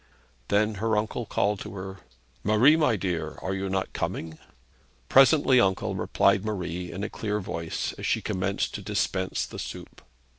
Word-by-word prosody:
Then 105 +2 +2
her 110 -1 +2
uncle 110 +2 -2
called 100 0 0
to - - -8
her: 95 0 -6 0.5
'Marie, 110 +9 +5
my 150 -8 +3
dear, 90 -5 -3
are 95 - -1
you 95 0 -2
not 95 0 -2
coming?' 80 -1 -4 0.7
'Presently, 135 -1 +6
uncle,' 95 -4 +1
replied 100 - +2
Marie, 90 -4 -3
in 100 - -5
a - - -1
clear 105 -1 -3
voice, 85 -4 -3
as - - -3
she - - +2
commenced 95 +1 -2
to - - -5
dispense 95 -1 -1
the - - -9
soup. - - -8
100 Hz, 160 wpm, -27 LUFS, 95-110 Hz, 0.7 s, Presently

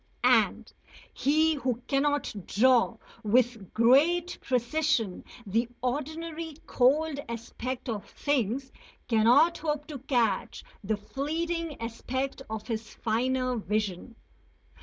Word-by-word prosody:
And - - +3 0.4
he 315 +3 +3
who 255 -4 -2
cannot 290 +1 +1
draw 240 0 +3 0.2
with 230 -2 +1
great 310 +10 +3
precision 250 -4 0 0.2
the 225 +4 0
ordinary 315 +5 -3
cold 285 +4 +2
aspect 235 +3 -5
of 215 -4 -4
things 265 -1 -1 0.4
cannot 250 +9 +4
hope 300 -2 -2
to 290 -3 -6
catch 245 -5 0 0.2
the 210 +2 0
fleeting 320 +8 -3
aspect 260 +4 -3
of 220 -1 -5
his 225 -2 -5
finer 255 +2 0
vision. 210 0 -2
255 Hz, 100 wpm, -28 LUFS, 230-295 Hz, 0.4 s, cannot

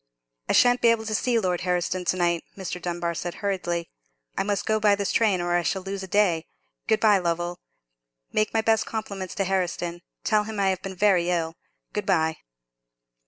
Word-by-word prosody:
"I - - +3
shan't 245 0 +5
be - - +5
able 230 -1 +3
to 220 - -3
see 240 +2 +1
Lord 180 -5 0
Herriston 180 0 -1
to 185 - +2
night," 170 -1 +1
Mr. 180 -2 -5
Dunbar 175 -1 -2
said, 175 +1 -4
hurriedly; 175 -4 -2 0.4
"I - - 0
must 200 0 -1
go 220 0 +2
by 210 -1 +4
this 200 -1 -1
train, 210 -5 +3
or 175 0 0
I 175 - +3
shall 190 +2 -1
lose 195 0 -4
a 190 - -6
day. 180 -5 +2 0.4
Good 220 -1 +3
bye, 210 -3 +5
Lovell. 175 0 -2 0.7
Make 215 - +1
my 225 - +2
best 220 0 +2
compliments 200 -4 -5
to 195 - 0
Herriston; 175 -2 -2 0.2
tell 210 -1 +2
him 215 -1 -5
I 195 -1 +3
have 185 -1 -1
been 190 0 -6
very 180 -3 +3
ill. 165 -2 0 0.4
Good 210 -2 -3
bye." 160 -4 +2
190 Hz, 200 wpm, -25 LUFS, 175-210 Hz, 0.7 s, shan't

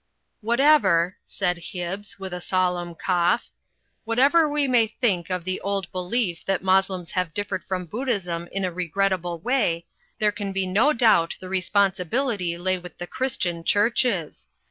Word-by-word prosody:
'Whatever," 215 - +3
said 180 -3 -2
Hibbs, 185 +3 -6
with 190 -2 -6
a 180 - -5
solemn 180 -2 -1
cough, 180 +5 +1 0.5
"whatever 280 +8 +4
we 290 -1 +1
may 240 -3 +4
think 205 -6 -1
of 180 -2 -2
the 185 +1 -3
old 195 -2 -2
belief 180 -1 -1
that 195 -1 0
Mos 190 0 +4
lems 180 -3 -6
have 180 -4 -2
differed 205 -2 -3
from 185 -1 -3
Buddhism 185 -6 -2
in 195 -1 -2
a 180 - -2
regrettable 180 0 -1
way, 170 -5 0 0.3
there 210 -1 +2
can 205 -1 -5
be 195 0 -1
no 205 +11 +3
doubt 220 - +3
the 185 - -9
responsibility 190 - 0
lay 185 +1 0
with 180 0 -12
the 175 - -5
C3iristian 175 -8 -1
Chiu 205 +6 +3
ches. 195 - -1
190 Hz, 160 wpm, -24 LUFS, 175-215 Hz, 0.5 s, whatever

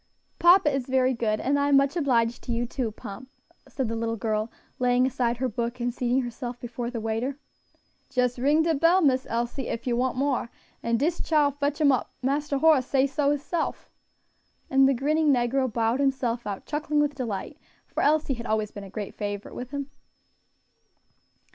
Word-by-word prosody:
"Papa 345 -4 +6
is 270 -2 -2
very 260 0 +2
good; 220 -3 -1
and 285 +2 +1
I 285 0 +2
am 280 - +6
much 275 +3 +2
obliged 240 -7 +1
to - - -3
you 235 +1 0
too, 240 -2 -3
Pomp," 215 +5 -9 0.4
said 265 -1 -3
the 230 - -3
little 230 0 -2
girl, 215 0 -2 0.3
laying 250 0 +3
aside 245 -2 0
her 260 +1 0
book, 235 +1 -3
and 240 0 -1
seating 250 +2 0
herself 240 0 -6
before 240 0 -5
the 240 -2 -4
waiter. 225 +5 -2 0.7
"Jes 250 -1 0
ring 295 +5 +3
de 325 0 +2
bell, 335 +5 +4
Miss 260 -3 +2
Elsie, 240 +3 -2
ef 230 - -4
you 245 -2 +1
want 250 +1 0
more, 270 -3 0 0.3
and 230 0 +1
dis 325 +5 0
chile 300 -3 +3
fotch 285 +1 0
'em 295 -2 +5
up; 255 - -1
Marster 285 +2 0
Horace 275 -3 +4
say 270 -1 +3
so 280 +1 0
hisself." 295 +3 -2 0.8
And 270 0 +5
the 275 - +2
grinning 300 +4 +2
negro 255 0 +1
bowed 230 +3 +1
himself 255 -5 0
out, 200 -2 -5
chuckling 300 0 -1
with 295 0 +2
delight, 225 -9 -5 0.3
for - - -3
Elsie 300 -2 +2
had 235 -1 -6
always 215 -1 0
been 205 - -8
a 195 - -10
great 205 +1 -6
favorite 205 -1 -5
with 250 0 -6
him. 280 0 -5
255 Hz, 190 wpm, -26 LUFS, 235-280 Hz, 0.8 s, Papa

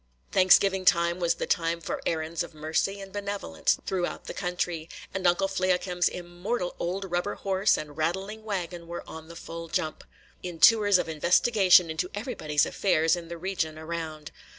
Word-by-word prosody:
Thanksgiving 190 +1 +5
time 170 0 +3
was 170 -1 +1
the - - -3
time 170 0 0
for 165 - -4
errands 160 0 -2
of - - -6
mercy 160 +6 -1
and 195 -1 -10
benevolence 200 - -1
through 180 -2 0 0.2
the - - -7
country; 175 -3 -3 0.2
and 190 -1 0
Uncle 175 +3 +3
Fliakim's 185 -1 +1
immortal 180 +3 -4
old 185 +3 -2
rubber 175 +3 -1
horse 195 +1 +2
and 150 -1 -7
rattling 190 +7 -2
wagon 175 -5 -4
were 170 0 -7
on 160 0 -9
the 170 - -11
full 165 0 -7
jump, 155 -1 -2 0.4
in 175 -2 -6
tours 205 +4 +6
of 180 - -2
investigation 180 +2 +4
into 170 +3 -2
everybody's 195 - 0
affairs 165 -4 +2
in 170 -1 -7
the 170 0 -7
region 165 -3 -2
around. 160 -2 -6
175 Hz, 165 wpm, -27 LUFS, 165-190 Hz, 0.4 s, tours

